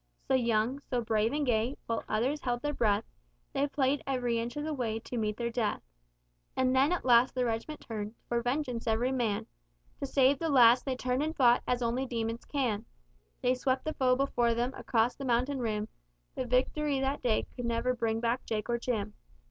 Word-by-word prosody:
So - - +1
young, 235 +1 +2
so 245 -1 0
brave 220 0 +1
and 295 0 0
gay, 240 +2 +1
while 230 -1 -2
others 265 +7 0
held 245 0 -2
their 295 0 -1
breath, 210 -4 +2 0.5
They 280 - +1
played 275 0 +1
ev'ry 245 -3 0
inch 235 +3 -4
of 295 - -2
the 310 0 -2
way 230 -5 -2
to 225 - -7
meet 215 -2 -1
their 235 -1 -2
death; 230 -3 -1 0.7
And 260 0 +2
then 275 +5 +4
at 360 - -1
last 245 0 +5
the 250 -1 +1
reg'ment 230 +7 -3
turned, 215 -1 -5
for 235 0 0
vengeance 245 -1 -2
ev'ry 230 +3 +1
man 235 -6 0 0.5
To - - -3
save 270 +1 +3
the 330 - -1
lads 245 -3 +7
they 265 -2 -2
turned 255 +1 -1
and 315 +2 -2
fought 245 -3 +5
as 250 0 0
only 245 +3 0
demons 230 -1 -3
can; 240 -7 -1 0.6
They 250 - +4
swept 260 +1 -1
the 310 - -1
foe 255 -1 +3
before 245 -3 +1
them 245 +3 -1
across 230 -1 +1
the 275 - -7
mountain 255 +2 +1
rim, 215 -3 -1 0.5
But 255 - -3
victory 275 +3 +1
that 270 +2 -1
day 230 -3 +1
could 245 - -4
never 235 +2 0
bring 225 -2 -1
back 235 +2 0
Jake 220 +1 -3
or 235 - 0
Jim. 215 -4 -2
245 Hz, 205 wpm, -30 LUFS, 230-265 Hz, 0.7 s, lads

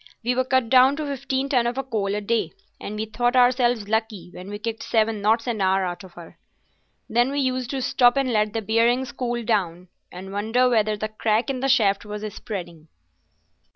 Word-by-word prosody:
We 245 +2 +1
were 255 +1 0
cut 260 -2 +1
down 260 +3 +5
to 305 +1 -4
fifteen 270 -1 -2
ton 250 -4 +2
of 240 - -2 0.2
coal 200 -2 -1
a 210 - -2
day, 205 -5 -1 0.3
and 210 - -6
we 215 +1 -3
thought 240 +3 -1
ourselves 245 -3 +3
lucky 220 -4 -2
when 185 +2 -9
we 205 - -5
kicked 225 +1 -5
seven 220 -2 0
knots 225 +3 +2
an 230 -4 -2
hour 190 0 +2
out 175 +1 -5
of 185 -2 -14
her. 170 -1 -13 0.7
Then 240 +2 +2
we 285 +1 -2
used 255 -2 -1
to 270 -2 -3
stop 245 +1 +3
and 265 -3 +1
let 210 -1 +1
the 225 -1 -2
bearings 235 +4 +1
cool 240 -1 -3
down, 180 -6 -1 0.2
and 190 +2 -9
wonder 225 +5 +1
whether 215 -3 +1
the 215 +1 -3
crack 220 +4 0
in 260 - -4
the 270 +1 -1
shaft 205 -6 +3
was 210 0 -7
spreading." 170 -6 -7
225 Hz, 205 wpm, -23 LUFS, 205-250 Hz, 0.7 s, down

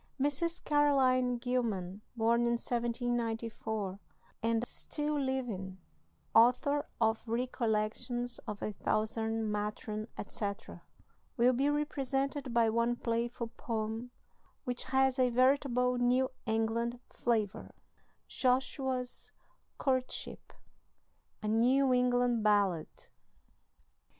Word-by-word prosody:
Mrs. 290 +5 0
Caroline 260 -4 +3
Gilman, 220 -6 -2
born 230 +1 +3
in 235 - +2
1794, 230 -4 -2 0.4
and 230 +1 +1
still 295 +3 -2
living, 240 -9 -3 0.6
author 250 +6 +4
of 220 -1 +2
"Recollections 240 0 0
of 210 -1 -5
a 210 - -2
Southern 220 0 0
Matron," 210 +1 -3
etc., 200 -1 -5 0.6
will 245 +2 +5
be 275 +4 +2
represented 275 -2 -1
by 235 -1 +4
one 235 +2 +1
playful 235 0 -2
poem, 225 +1 -3 0.5
which 245 -1 -2
has 265 0 +2
a 255 -1 +4
veritable 250 0 +2
New 250 +2 +2 0.2
England 225 +2 0
flavor: 220 -5 -1 0.6
JOSHUA'S 255 0 0 0.5
COURTSHIP. 260 -2 -2 0.9
A - - -2
NEW 255 +5 +3
ENGLAND 245 -2 +2
BALLAD. 200 -6 +3
240 Hz, 90 wpm, -32 LUFS, 220-255 Hz, 0.9 s, will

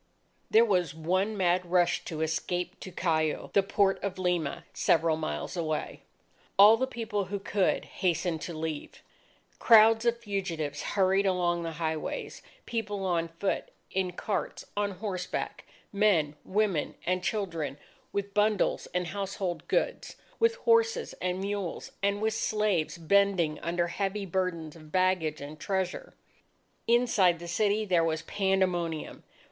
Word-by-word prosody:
There 225 +2 +6
was 180 -8 +1
one 185 +6 0
mad 180 -1 +2
rush 175 0 +2
to 160 -3 -4
escape 175 +3 -2
to 185 - -8
Callao, 160 -4 0
the 200 - +5
port 195 0 +1
of 195 -2 -3
Lima, 170 -3 -1
several 165 -1 +3
miles 75 - -4
away. 155 -3 -3 0.6
All 205 +3 +9
the 260 +3 -1
people 225 -5 -3
who 200 +2 -3
could, 200 -1 0
hastened 175 -2 -1
to 170 -3 -5
leave. 155 -2 -5 0.6
Crowds 225 0 +7
of 235 0 +2
fugitives 185 -9 -3
hurried 195 0 +2
along 175 -2 +1
the 165 -1 -4
highways, 160 -1 -3 0.2
people 205 -4 -3
on 170 -2 +1
foot, 165 +4 -2 0.2
in 185 -1 -1
carts, 205 +4 -3
on 205 0 0
horseback; 185 -2 -4 0.3
men, 185 -8 +3
women, 195 -6 0
and 180 +1 0
children, 170 -9 -2 0.3
with 200 0 -3
bundles 210 0 +1
and 180 0 +1
household 195 -1 -4
goods, - - -1 0.2
with 460 0 +3
horses 460 0 +3
and 185 +1 -1
mules, 200 -3 -3
and 200 +1 0
with 220 0 +1
slaves 210 -7 0
bending 175 -2 +2
under 170 +1 0
heavy 195 +3 -2
burdens 170 -4 -2
of 155 -2 -14
baggage 185 -5 +1
and 150 +2 -8
treasure. 190 +1 -3 0.7
Inside 230 -7 +4
the 170 +1 -9
city, 210 +4 +1
there 175 -4 +3
was 160 -1 -1
pandemonium. 185 -5 -1
185 Hz, 140 wpm, -29 LUFS, 165-205 Hz, 0.7 s, All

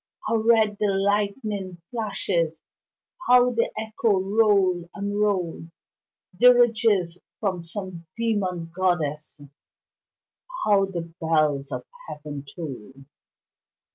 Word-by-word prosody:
how 230 - +1
red 220 -2 +3
the 210 - +2
lightning 200 -1 -1
flashes! 195 -8 -2 0.6
How 250 0 +6
the 230 -1 0
echoes 215 -3 0
roll 195 -4 +2
and 205 0 -3
roll 180 -6 -1 0.7
Dirges 225 -7 +4 0.2
from 185 -5 -2
some 175 -1 -7
demon 190 -7 -1
goddess 155 -6 -1 1.3
How 200 -2 +4
the 170 -3 -6
bells 155 -4 +1
of - - -5 0.2
heaven 150 -2 -7
toll! 135 - -7
195 Hz, 95 wpm, -24 LUFS, 170-215 Hz, 1.3 s, How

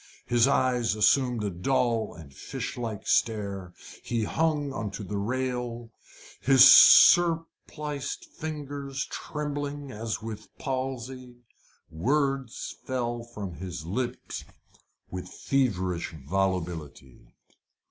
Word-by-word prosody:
His 120 +1 +3
eyes 125 -5 +2
assumed 120 +1 +3
a 100 - -1
dull 115 +4 0
and 75 -5 -12
fish - - -6
like 115 -4 -5
stare. 100 -5 0 0.3
He 115 -2 -2
hung 150 +2 0
on 110 -5 -3
to 105 - -7
the 100 +1 -4
rail, 120 0 -3 0.5
his 135 -1 +7
surpliced 160 -4 +5
figure 145 -3 -6 0.2
trembling 145 -1 -4
as 110 -1 -4
with 110 -1 -7
palsy. 130 -1 -5 0.5
Words 135 - -1
fell 120 -2 -2
from 105 -6 -7
his 90 -3 -6
lips 120 +8 -4 0.7
with 90 0 -6
feverish 95 -11 -1
volubility. 85 -8 -3
120 Hz, 100 wpm, -27 LUFS, 100-135 Hz, 0.7 s, his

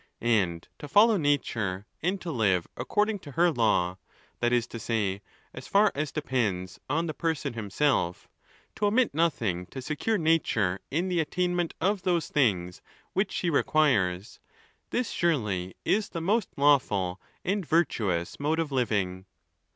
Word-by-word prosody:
And 85 -5 0
to 145 - -7
follow 215 +8 +5
nature, 115 - 0 0.2
and 185 +4 0
to 170 - -4
live 100 - +1
according 210 - 0
to 145 -6 -11
her 175 +3 +4
law, 100 - +1 0.4
that 120 0 +1
is 120 -2 +2
to 115 - -7
say, 105 -4 -1 0.3
as 130 - -9
far 205 +1 +4
as 150 +1 -2
'depends 105 -11 -2
on 160 +4 +1
the 155 - -3
person 155 -5 -2
himself, 110 -3 0 0.5
to 210 - +2
omit 235 - +2
nothing 115 - 0
to 135 - -8
secure 155 - -1
nature 135 - +1
in 170 +6 0
the 180 -2 0
attainment 175 +1 -1
of. 195 +3 +1
those 175 -3 0
things 95 -11 +1 0.3
which 195 +3 0
she 175 - -1
requires, 115 - +1 0.5
this 245 -2 -1
surely 105 - 0
is 210 0 +1
the 170 - -4
most 205 +6 +1
lawful 105 -11 +2 0.2
and. 200 +2 0
virtuous 110 - 0
mode 150 +3 0
of 165 -3 -1
living. 100 -7 -1
140 Hz, 150 wpm, -28 LUFS, -, 0.5 s, follow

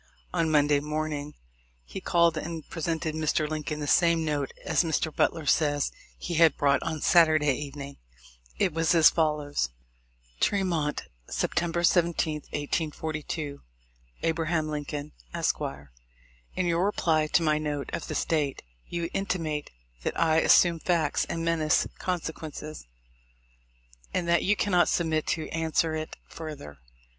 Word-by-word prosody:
On 160 - +1
Monday 145 -1 +4
morning 150 0 -3 0.5
he - - -7
called 170 -1 +3
and 160 0 -5
presented 160 -1 -2
Mr. 155 -1 0
Lincoln 150 0 -3
the - - -2
same 165 +3 +3
note 145 -3 -1
as - - +2
Mr. 160 -1 -1
Butler 160 - +1
says 145 0 +2 0.3
he 175 - -5
had 165 -1 +5
brought 140 -1 +3
on 160 -2 -3
Saturday 155 -5 +5
evening. 140 0 -7 0.6
It 170 - +1
was 165 +1 +2
as 160 -2 +7
fol 155 -2 +2
lows: 145 - -2 0.3
— - - -35
Tremont, 170 -7 +1 0.3
September 170 0 -1
17, 170 -2 +2 0.2
1842. 155 -1 -3 0.6
A. 165 - +3
Lincoln, 155 -3 -2 0.2
Esq.: - - 0 0.5
— - - -32
In 185 - 0
your 170 0 +1
reply 160 -6 +2
to 165 - +2
my 155 -1 +2
note 150 -2 -3
of - - -4
this - - -1
date, 150 -4 -1 0.2
you 170 -1 -2
intimate 165 -6 -2 0.3
that - - -3
I 160 -1 +3
assume 170 +1 +5
facts 160 -4 +1
and 165 0 -3
menace 160 -2 +2
con 180 -1 -1
sequences, 155 - -7 1.3
and 175 - 0
that 170 -1 +3
you 210 - +3
cannot 180 -4 +2
submit 160 -2 0
to 160 - -1
answer 160 0 0
it 155 0 -4
further. 150 - -8
155 Hz, 140 wpm, -27 LUFS, 150-165 Hz, 1.3 s, as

